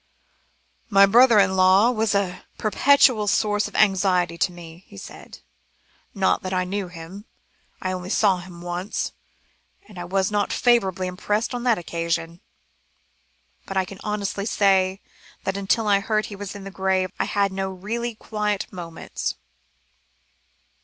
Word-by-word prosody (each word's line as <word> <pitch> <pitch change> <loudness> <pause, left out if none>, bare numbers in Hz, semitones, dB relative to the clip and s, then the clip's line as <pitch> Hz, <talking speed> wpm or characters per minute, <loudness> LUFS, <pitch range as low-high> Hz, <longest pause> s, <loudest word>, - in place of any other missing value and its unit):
"My 200 -2 +7
brother 235 +3 +6
in 190 -2 +4
law 190 +5 +5
was 220 -3 0
a 190 -3 -1 0.2
perpetual 240 -1 +4
source 210 0 +1
of - - -13
anxiety 185 -4 +2
to 170 - 0
me," 170 0 -12
he - - -14
said; - - -11 0.7
"not 195 -1 +2
that 185 0 -3
I 185 - +1
knew 195 +1 -3
him. 175 +4 -10 0.6
I 185 - -1
only 185 0 -5
saw 200 -2 +3
him 175 -1 -11
once, 175 +3 -3 0.8
and 200 -4 -11
I 175 - -5
was 190 +2 0
not 205 -1 0
favourably 195 -7 +2
impressed 210 +6 -2
on 245 - -3
that 235 -3 +3
occasion; 170 0 -3 1.3
but 195 - -4
I 190 - +2
can 190 +1 -11
honestly 205 -1 -3
say 195 -2 +2 0.4
that 195 - -2
until 200 +3 0
I 200 -1 +4
heard 215 +1 0
he 205 - -8
was 200 0 -7
in 200 -1 -9
his 195 - -8
grave, 190 -1 0
I - - +1
had 200 -1 0
no 190 0 -3
really 220 +5 -4
quiet 210 -2 -3
moments." 170 -3 -5
195 Hz, 155 wpm, -23 LUFS, 185-210 Hz, 1.3 s, My